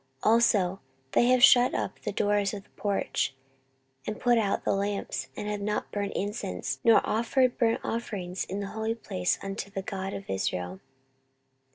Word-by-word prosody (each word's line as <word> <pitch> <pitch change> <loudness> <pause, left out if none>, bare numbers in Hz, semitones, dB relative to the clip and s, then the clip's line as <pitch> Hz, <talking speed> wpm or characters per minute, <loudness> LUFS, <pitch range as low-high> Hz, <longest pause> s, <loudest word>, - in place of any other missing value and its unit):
14:029:007 215 - +5
Also 195 -5 +3 0.3
they 240 - +4
have 250 -1 +4
shut 250 -2 +7
up - - -3
the 210 - -3
doors 205 0 +1
of 200 - -8
the - - -29
porch, 200 -9 -1 0.7
and 215 - -3
put 240 -1 +4
out 205 -3 0
the - - +2
lamps, 200 -9 -2
and 210 - -4
have 210 -1 -2
not 210 +1 -2
burned 200 -1 -2
incense 135 - -3
nor 230 - +5
offered 245 +3 +2
burnt 230 -1 +3
offerings 190 -6 -3
in 195 +2 -4
the 200 - -4
holy 220 +1 -1
place 90 - -1
unto 195 0 -4
the 195 -1 -5
God 195 0 -4
of 195 - -7
Israel. 90 -1 -2
205 Hz, 175 wpm, -28 LUFS, 195-225 Hz, 0.7 s, shut